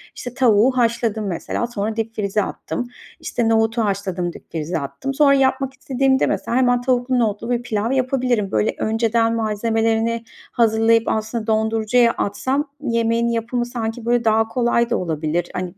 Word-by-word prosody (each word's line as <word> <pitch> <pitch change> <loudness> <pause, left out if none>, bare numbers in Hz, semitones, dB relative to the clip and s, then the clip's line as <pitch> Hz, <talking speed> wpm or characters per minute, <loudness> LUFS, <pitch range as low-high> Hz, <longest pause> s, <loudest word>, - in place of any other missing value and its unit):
işte, 245 - -7
tavuğu 250 0 +3
haşladım, 230 -3 0
mesela, 195 +6 -3
sonra 220 -2 -3
dipfrize 215 -2 -1
attım. 245 +4 -5 0.3
İşte, 235 -2 -1
nohutu 225 0 +2
haşladım, 190 -3 -2
dipfrize 165 +1 -4
attım. 140 - -5
Sonra 280 0 +5
yapmak 270 0 +1
istediğimde, 265 -1 +1
mesela, 235 - -1
hemen 245 -1 +3
tavuklu, 250 0 +1
nohutlu 225 0 -1
bir 240 -1 0
pilav 220 0 -1
yapabilirim. 250 -5 0
Böyle, 215 - +1
önceden 225 +1 +1
malzemelerini 225 +1 0 0.3
hazırlayıp 225 0 +3
aslında 220 +1 -2
dondurucuya 220 +2 +2
atsam 265 +8 -2
yemeğin 230 -2 +1
yapımı 235 +1 -1
sanki, 230 -1 -4
böyle, 240 0 +2
daha 220 0 +3
kolay 235 0 +1
da - - +1
olabilir. 165 0 -2
Hani, 180 0 -5
230 Hz, 145 wpm, -20 LUFS, 215-245 Hz, 0.3 s, Sonra